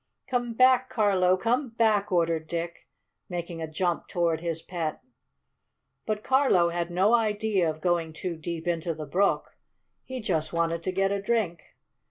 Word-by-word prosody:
"Come 245 -2 -1
back, 255 +1 +5
Carlo! 190 -4 +3
Come 245 +7 0
back!" 215 -3 +2
ordered 165 -2 +1
Dick, 170 0 -5 0.4
making 170 -2 -5
a 160 - -3
jump 175 +2 -1
toward 170 -2 0
his 165 -1 -3
pet. 165 -4 -3 1.1
But 215 -1 -2
Carlo 260 -11 +4
had 170 0 -2
no 190 +6 +3
idea 210 -5 +2
of 155 0 -5
going 170 -3 +1
too 170 +2 -4
deep 165 +1 -5
into 170 -1 -1
the 155 -1 -6
brook. 190 +8 0 0.5
He 260 0 -6
just 175 -9 -1
wanted 170 0 0
to 185 - -2
get 195 +1 +1
a 200 0 -1
drink. 200 -6 -2
180 Hz, 160 wpm, -27 LUFS, 165-215 Hz, 1.1 s, back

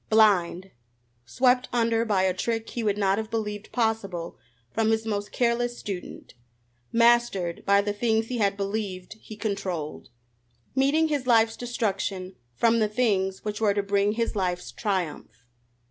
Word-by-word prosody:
Blind! 195 -4 +3 0.6
Swept 250 - +2
under 230 -1 +2
by 200 -4 +2
a 190 -1 +2
trick 225 +4 -2
he 235 - -3
would 205 -1 +1
not 195 0 +2
have 220 0 -5
believed 210 -2 -4
possible 220 -8 -1 0.4
from 220 0 +1
his 220 0 +1
most 205 -2 -3
careless 240 0 0
student! 195 -3 -7 0.6
Mastered 230 -7 +3
by 200 0 +5
the 205 0 -2
things 220 +1 +1
he 245 +1 -4
had 200 -2 +1
believed 200 -2 -3
he 215 - -10
controlled! 185 -8 -4 0.7
Meeting 290 +4 +3
his 285 -4 -1
life's 225 -2 +4
destruction 195 -6 -3 0.2
from 230 - +3
the 215 -1 +2
things 200 -5 0
which 210 0 -3
were 205 -2 +3
to 205 - +1
bring 200 +1 +1
his 230 0 -1
life's 180 -3 -2
triumph! 165 - -3
210 Hz, 150 wpm, -26 LUFS, 195-230 Hz, 0.7 s, by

